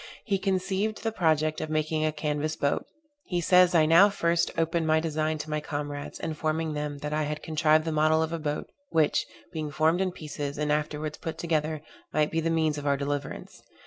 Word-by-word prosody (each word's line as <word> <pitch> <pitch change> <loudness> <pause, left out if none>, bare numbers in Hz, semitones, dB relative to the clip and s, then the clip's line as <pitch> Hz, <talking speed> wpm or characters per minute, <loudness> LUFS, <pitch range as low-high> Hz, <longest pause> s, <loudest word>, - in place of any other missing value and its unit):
He 200 -4 0
conceived 195 +2 -1
the 225 - 0
project 155 -5 +1
of 155 - -4
making 155 0 0
a 155 - +2
canvas 150 0 -2
boat. 140 -2 -1 0.4
He 175 -3 0
says 180 +1 +5
I 160 -2 +6
now 170 +6 +7
first 170 -3 +1
opened 165 0 +1
my 155 0 +4
design 155 -1 -1
to 150 0 -6
my 150 - 0
comrades, 145 -1 -5
informing 155 0 -2
them, 150 -1 -3
that 150 - -2
I 155 - +1
had 150 0 -3
contrived 155 0 +3
the 160 - -1
model 155 +1 +3
of 160 +1 -3
a 165 - -2
boat, 150 -1 -3 0.2
which, 155 -2 +2 0.3
being 155 -2 -3
formed 160 +4 +2
in 190 -1 0
pieces, 145 -4 -5
and 150 0 0
afterwards 150 0 -2
put 160 - -5
together, 155 -2 -1 0.3
might 150 -1 +1
be 165 - 0
the 165 +1 0
means 160 -2 +1
of 145 - -5
our 140 0 +3
deliverance. 140 0 -4
155 Hz, 205 wpm, -27 LUFS, 150-165 Hz, 0.4 s, now